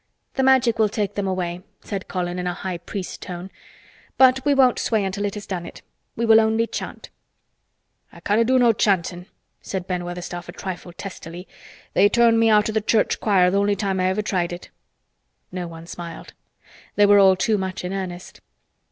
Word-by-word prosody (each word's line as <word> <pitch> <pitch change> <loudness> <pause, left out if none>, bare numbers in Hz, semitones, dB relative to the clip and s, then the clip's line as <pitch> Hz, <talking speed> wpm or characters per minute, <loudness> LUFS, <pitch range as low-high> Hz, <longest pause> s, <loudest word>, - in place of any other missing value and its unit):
"The 265 - 0
Magic 260 -4 +3
will 215 -1 +4
take 205 -1 -2
them 200 -1 -2
away," 180 -2 -3 0.2
said 195 -2 -5
Colin 180 -1 -3
in 180 - -3
a 175 - -2
High 185 -2 -5
Priest 185 +2 -7
tone, 180 +1 -7 0.7
"but 260 0 +5
we 290 - +2
won't 260 -2 +4
sway 220 -3 0
until 195 +2 -3
it 200 - -3
has 205 - -7
done 180 -3 -4
it. - - -11 0.3
We 235 - -1
will 225 0 +7
only 220 +1 +1
chant." - - -7 1.0
"I - - -14
canna' 210 +3 +2
do 260 +3 +3
no 240 -2 +5
chantin'" 185 -3 0 0.3
said 190 -2 -5
Ben 180 -1 -3
Weatherstaff 175 0 -6
a - - -7
trifle 185 -2 -7
testily. 175 -1 -9 0.5
"They 200 +2 +5
turned 235 0 +4
me 225 0 +4
out 210 -1 +4
o' 220 - -3
th' 215 -1 -2
church 220 - +2
choir 185 -4 +3
th' - - -4
only 200 +1 +2
time 195 -1 -1
I 185 - +2
ever 190 +3 0
tried 180 -4 -1
it." 175 0 -9 0.8
No 180 -1 -4
one 165 0 -10
smiled. 170 -1 -9 0.6
They 205 - +5
were 205 0 +6
all 190 -1 +6
too 210 +3 +1
much 190 -1 -4
in 180 - -3
earnest. 185 -2 -6
195 Hz, 195 wpm, -22 LUFS, 180-220 Hz, 1.0 s, will